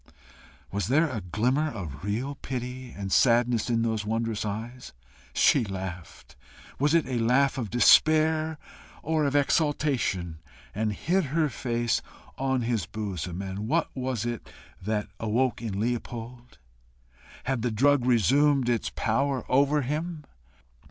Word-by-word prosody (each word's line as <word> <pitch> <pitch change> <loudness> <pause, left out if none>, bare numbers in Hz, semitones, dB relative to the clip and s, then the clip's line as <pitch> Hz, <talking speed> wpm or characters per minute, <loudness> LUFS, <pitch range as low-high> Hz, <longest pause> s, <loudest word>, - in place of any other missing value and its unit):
Was 100 -1 -2
there 155 +7 +3
a 110 -5 -3
glimmer 125 - 0
of 85 - -7
real 115 +8 -2
pity 125 -1 -6
and 100 -3 -6
sadness 120 0 +3
in 115 -1 +1
those 110 -2 -1
wondrous 115 0 -2
eyes? 115 +5 -6 0.4
She - - +4
laughed 95 -4 -7 0.4
was 145 +4 +3
it 165 - +3
a 125 -2 -2
laugh 130 +4 +2
of 115 -5 -3
despair 155 - +4 0.5
or 155 -1 +1
of 140 0 0
exultation? 135 - +1 0.3
and 110 +1 -1
hid 175 - 0
her 155 +2 +1
face 120 -1 -1 0.3
on 130 -2 0
his 115 -3 -1
bosom. 95 -4 -4
And 95 +2 -5
what 165 +7 0
was 130 -4 -2
it 120 -2 -4 0.3
that 105 +2 -2
awoke 115 +2 0
in 105 -4 -3
Leopold? 120 +1 -4 0.9
Had 130 -3 -1
the 125 - 0
drug 135 +4 +3
resumed 130 - +3
its 120 -2 0
power 135 +3 0
over 140 +2 +3
him? 155 +4 -3
120 Hz, 135 wpm, -27 LUFS, 110-140 Hz, 0.9 s, She